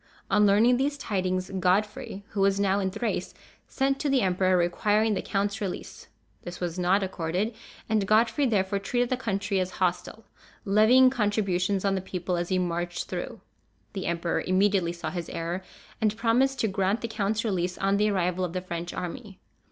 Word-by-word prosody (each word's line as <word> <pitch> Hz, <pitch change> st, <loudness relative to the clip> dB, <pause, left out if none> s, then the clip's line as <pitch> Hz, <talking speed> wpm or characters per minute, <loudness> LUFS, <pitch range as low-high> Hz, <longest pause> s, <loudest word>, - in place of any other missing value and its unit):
On 210 Hz, 0 st, +5 dB
learning 225 Hz, +5 st, +5 dB
these 285 Hz, +2 st, 0 dB
tidings, 185 Hz, -6 st, -2 dB
Godfrey, 200 Hz, +2 st, 0 dB
who 200 Hz, -, -2 dB
was 195 Hz, 0 st, +3 dB
now 200 Hz, 0 st, +2 dB
in 190 Hz, -1 st, 0 dB
Thrace, 230 Hz, +5 st, -3 dB, 0.3 s
sent 270 Hz, 0 st, 0 dB
to 295 Hz, -, -1 dB
the 270 Hz, -2 st, +3 dB
emperor, 185 Hz, 0 st, +2 dB
requiring 210 Hz, +5 st, +2 dB
the -, -, -1 dB
count's 200 Hz, +1 st, -2 dB
release. 195 Hz, -3 st, -6 dB, 0.3 s
This 175 Hz, 0 st, -8 dB
was 175 Hz, 0 st, -3 dB
not 185 Hz, +3 st, +2 dB
accorded, 185 Hz, +4 st, -2 dB, 0.3 s
and 215 Hz, -3 st, +1 dB
Godfrey 230 Hz, +6 st, +3 dB
therefore 200 Hz, -3 st, +1 dB
treated 245 Hz, +5 st, -1 dB
the -, -, +3 dB
country 200 Hz, -5 st, -1 dB
as 185 Hz, 0 st, -2 dB
hostile, 185 Hz, +4 st, -2 dB, 0.4 s
levying 225 Hz, +6 st, +6 dB
contributions 200 Hz, -5 st, 0 dB
on 195 Hz, -, +2 dB
the 190 Hz, -, -1 dB
people 180 Hz, -1 st, -3 dB
as 175 Hz, 0 st, -2 dB
he 185 Hz, -, +1 dB
marched 175 Hz, -1 st, -2 dB
through. -, -, -5 dB, 0.5 s
The 190 Hz, -, -4 dB
emperor 170 Hz, 0 st, -1 dB
immediately 185 Hz, -2 st, +2 dB
saw 170 Hz, -2 st, -5 dB
his 175 Hz, -2 st, -5 dB
error, 170 Hz, +3 st, -3 dB, 0.4 s
and 215 Hz, 0 st, +1 dB
promised 255 Hz, +4 st, +2 dB
to 220 Hz, -, +2 dB
grant 195 Hz, +2 st, 0 dB
the 230 Hz, -, -2 dB
count's 215 Hz, 0 st, -1 dB
release 180 Hz, -4 st, -1 dB
on 195 Hz, +1 st, +1 dB
the 210 Hz, +1 st, +2 dB
arrival 185 Hz, -2 st, 0 dB
of 175 Hz, -2 st, -3 dB
the 185 Hz, -, -2 dB
French 175 Hz, -1 st, -5 dB
army. 195 Hz, +2 st, -6 dB
195 Hz, 180 wpm, -27 LUFS, 180-215 Hz, 0.5 s, levying